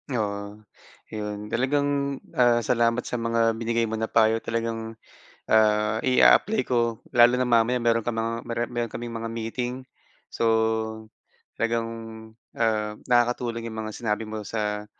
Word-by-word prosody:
Oo 100 -1 -4 0.5
'yon, 105 -1 -5
talagang, 140 +4 +1 0.4
ah, 120 -1 +3
salamat 115 +1 +1
sa 125 - -4
mga 115 -1 +1
binigay 115 0 0
mo 110 0 -2
na 110 - -1
payo 115 0 +3
talagang, 115 -1 -3 0.5
ah, 105 0 +3
i-a-apply 205 +11 +5
ko. 115 -2 0
Lalo 120 +1 +5
na 125 - +2
mamaya 120 +1 +3
meron 115 -1 +1
kang 120 - -1
mga 115 +1 -3 0.2
meron 120 -1 -3
kaming 120 0 -5
mga 115 0 -4
meeting. 120 +2 -3 0.6
So, - - -4 1.1
talagang, 115 0 0 0.7
ah, 110 -2 0 0.2
nakakatulong 120 -1 +1
'yong 110 -1 -6
mga 110 -1 -6
sinabi 110 -1 -2
mo 110 -1 -6
sa, 105 -1 -3
115 Hz, 135 wpm, -25 LUFS, 110-120 Hz, 1.1 s, i-a-apply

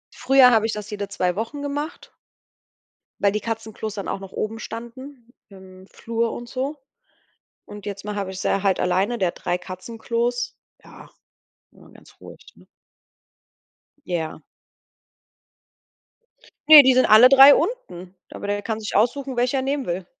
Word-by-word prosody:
Früher 260 -1 +5
habe 220 -2 +3
ich 225 - -3
das 210 -1 -7
jede 205 -1 -5
2 180 -2 -2
Wochen 230 +7 -5
gemacht 290 +3 -6 1.1
weil 200 -1 +2
die 210 - -2
Katzenklos 220 -1 -6
dann 200 - -6
auch - - -4
noch 195 -1 -11
oben 225 +1 -4
standen 240 +2 -10 0.2
im 190 -1 -15
Flur 230 0 -3
und 240 0 -9
so. 270 +3 -4 0.9
Und 205 0 -12
jetzt 200 -1 -7
mache 210 0 -5
habe 195 -2 -4
ich 190 0 -8
sie - - -1
ja 195 - 0
halt 195 -2 +1
alleine, 190 +6 0
der 185 -4 +1
hat - - -10
3 175 0 -1
Katzenklos. 230 - -4 0.3
Ja, - - -16 0.6
immer - - -20
ganz - - -20
ruhig, - - -13
ne? - - -21 1.4
Ja. 160 -3 -4 2.3
Ne, 305 -2 +12
die 260 -1 +4
sind 255 +1 +3
alle 220 +4 +8
3 275 +2 +8
unten, 185 - -4 0.2
aber 205 - -8
der 205 0 -2
kann 220 0 -4
sich 215 - -6
aussuchen, 260 +5 0
welcher 250 +3 0
er 260 - -1
nehmen 275 0 -2
will. 175 +1 -4
220 Hz, 160 wpm, -22 LUFS, 195-255 Hz, 2.3 s, Ne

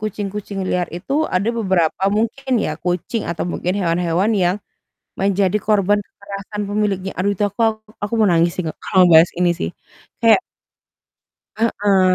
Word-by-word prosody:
kucing-kucing 205 -1 -4
liar 180 -1 0
itu, 175 +10 -6 0.2
ada 190 +4 +1
beberapa 185 -5 +1
mungkin 245 +5 -1
ya, - - -1
kucing 180 +5 -1
atau 170 - -3
mungkin 180 - -1
hewan-hewan 175 +3 +1
yang 175 +2 +2 0.6
menjadi 195 0 +2
korban 205 -1 +3
kekerasan 200 +1 -7
pemiliknya, 200 -2 -1
aduh, 200 +2 +1
itu 205 +2 0
aku 205 +3 -12 0.4
aku 205 - -3
mau 215 - +5
nangis 170 0 +3
sih, 185 - -1 0.2
kalau - - -4
mau 180 - +5
bahas 165 +2 +6
ini 180 -1 +3
sih, 80 - -2 0.5
kayak 230 -1 +6 1.2
Heeh. 200 -4 +3
195 Hz, 150 wpm, -19 LUFS, 180-210 Hz, 1.2 s, bahas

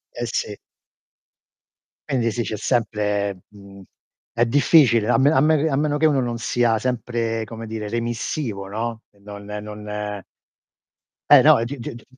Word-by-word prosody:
Eh - - -3
sì. - - -3 1.5
Quindi 120 -5 0
sì, 120 +1 -2
c'è 110 - -4
sempre 105 -5 -1
mhmm, 100 -1 -14 0.5
è 120 0 +2
difficile, 120 -4 +4
a - - +4
men 140 +3 +4
a 130 - +4
me 155 +2 +4
che 160 - +1
a 135 - 0
meno 150 0 0
che 155 - +2
uno 145 -3 +3
non 120 -2 -2
sia 115 0 +1
sempre, 115 -1 -2
come 115 +1 -8
dire, 110 -1 -5
remissivo, 115 -2 -3
no, 115 +2 -4
e 100 - -28
non 100 0 -10
non 105 -1 -6 1.1
Eh - - +9
no, - - +6
e 115 - -1
di 140 +3 -6
di 115 - -6
d 115 - -13
115 Hz, 170 wpm, -22 LUFS, 105-125 Hz, 1.5 s, Eh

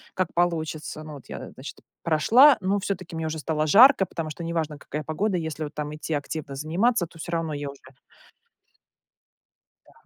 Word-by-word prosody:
как 185 -2 -1
получится. 160 -3 -1
Ну 155 - -9
вот 140 - -12
я, - - -7
значит, 135 +1 -10 0.3
прошла, 230 - +6
ну 195 +2 +1
всё-таки 190 -3 -4
мне 160 0 -2
уже 160 0 -3
стало 155 0 -1
жарко, 235 - +7
потому 165 -2 -5
что 170 - -7
неважно, 165 -3 -2
какая 150 +1 -5
погода. 180 +6 -1
Если 160 -1 -4
вот 150 0 -6
там 150 0 -4
идти 155 +1 -4
активно 145 -1 -5
заниматься, 175 - +1
то 165 0 -17
всё 170 +2 -6
равно 165 -2 -1
я 145 -1 -4
уже 140 0 -11 2.1
Да, - - -21
160 Hz, 180 wpm, -25 LUFS, 150-180 Hz, 2.1 s, жарко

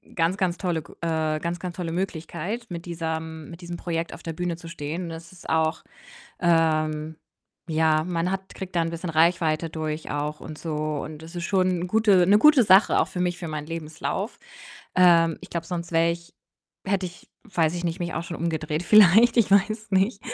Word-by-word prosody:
ganz, 170 +2 +1
ganz 180 -3 0
tolle 175 -4 -1
g - - -16
äh, 160 -2 0
ganz, 170 +1 -3
ganz 180 -1 -6
tolle 170 -3 -4
Möglichkeit, 180 +5 -4
mit 170 -1 -6
diesem 160 -2 -5
mit 170 +1 -11
diesem 175 0 -6
Projekt 165 -1 -3
auf - - -11
der 165 - -4
Bühne 175 +1 -2
zu 170 - -11
stehen. 165 +1 -5
Das 165 +1 -9
ist 180 - -12
auch, 160 0 +1 0.6
ähm 155 -2 +1 0.5
ja, 155 -1 +3
man 175 +1 -1
hat 195 0 -5
kriegt 190 -1 -8
da 170 - +3
'n 165 - -1
bisschen 170 +1 -5
Reichweite 165 0 +2
durch 155 0 -4
auch 150 +1 -3
und 155 -1 -8
so 160 -2 -5 0.3
und 155 -1 -8
das 165 +2 -11
ist 170 -1 -3
schon 185 -1 +2 0.2
'n 180 - -3
gute 205 -3 +4
'ne 205 +2 +6
gute 295 +1 +6
Sache 195 0 +5
auch 160 - +2
für 190 -1 -6
mich, 180 -1 0
für 175 - -6
meinen 155 -1 -5
Lebenslauf. 165 +6 -4 0.6
Ähm, 170 -3 +5
ich - - -11
glaube, 165 -1 -4
sonst 170 -1 -4
wäre 165 0 +3
ich 170 0 -8 0.5
hätte 195 -1 0
ich, 175 -1 -11
weiß 170 -7 0
ich 175 - -4
nicht, 170 0 -2
mich 175 -1 -3
auch 165 - -2
schon 170 - -6
umgedreht 160 -1 -2
vielleicht, 215 +5 +6
ich 205 -4 +3
weiß 215 +2 +2
nicht. 195 +3 +2
170 Hz, 205 wpm, -25 LUFS, 160-185 Hz, 0.6 s, ne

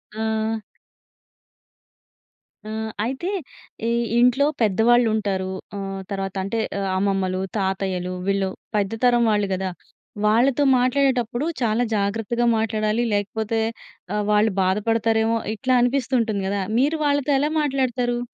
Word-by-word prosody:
ఆ! 220 0 -1 2.1
ఆ! - - -5 0.3
అయితే 265 +10 -3 0.6
ఈ - - +1 0.3
ఇంట్లో 250 +3 +4 0.2
పెద్దవాళ్ళు 225 +3 +4
ఉంటారు. 190 -3 -1 0.3
ఆహ్, 195 -1 -4
తర్వాత 195 -1 -3
అంటే 200 +4 -2 0.2
ఆహ్, 195 -1 -1
అమ్మమ్మలు, 190 -1 0 0.2
తాతయ్యలు 190 -2 -1
వీళ్ళు 195 -1 +1 0.3
పెద్ద 200 -2 +1
తరం 240 -1 +4
వాళ్ళు 205 -1 +1
గదా! 190 0 -2 0.6
వాళ్ళతో 245 +6 +3
మాట్లాడేటప్పుడు 250 0 +1 0.2
చాలా 230 0 +2
జాగ్రత్తగా 225 +4 0
మాట్లాడాలి. 220 +1 0
లేకపోతే 220 +2 -1 0.5
ఆహ్, 210 - 0
వాళ్ళు 210 0 +3
బాధపడతారేమో! 225 +3 +1 0.2
ఇట్లా 255 +3 0
అనిపిస్తుంటుంది 245 -5 +1
గదా! 200 0 -1 0.2
మీరు 295 +5 +2
వాళ్ళతో 285 0 +1
ఎలా 295 +2 +1
మాట్లాడతారు? 255 -4 0
220 Hz, 110 wpm, -23 LUFS, 200-245 Hz, 2.1 s, ఇంట్లో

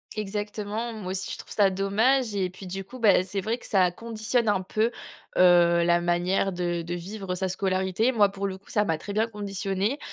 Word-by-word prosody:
Exactement, 210 +2 -3
moi 190 -4 -5
aussi 190 0 -3
je - - -6
trouve - - -12
ça 200 -2 +4
dommage 215 +6 +1
et 190 -2 0
puis 185 +2 -11
du 195 +1 -5
coup, 255 - -11
bah 210 -5 +4
c'est 195 +1 -3
vrai 225 +4 -1
que - - -15
ça 185 -3 +3
conditionne 225 +3 -1
un 200 -2 +2
peu, 215 +4 0 0.5
heu, 175 -1 +6
la 175 0 +3
manière 175 +2 +1
de 175 -1 -1
de 170 +1 -5
vivre 185 +1 -5
sa 190 0 -2
scolarité. 190 +4 0
Moi, 205 -4 +4
pour 200 0 -3
le 190 - -5
coup, 195 - -23
ça 210 -1 +1
m'a 160 -3 0
très 200 - -7
bien 220 +2 +1
conditionnée. 200 +3 -2
195 Hz, 215 wpm, -26 LUFS, 185-215 Hz, 0.5 s, heu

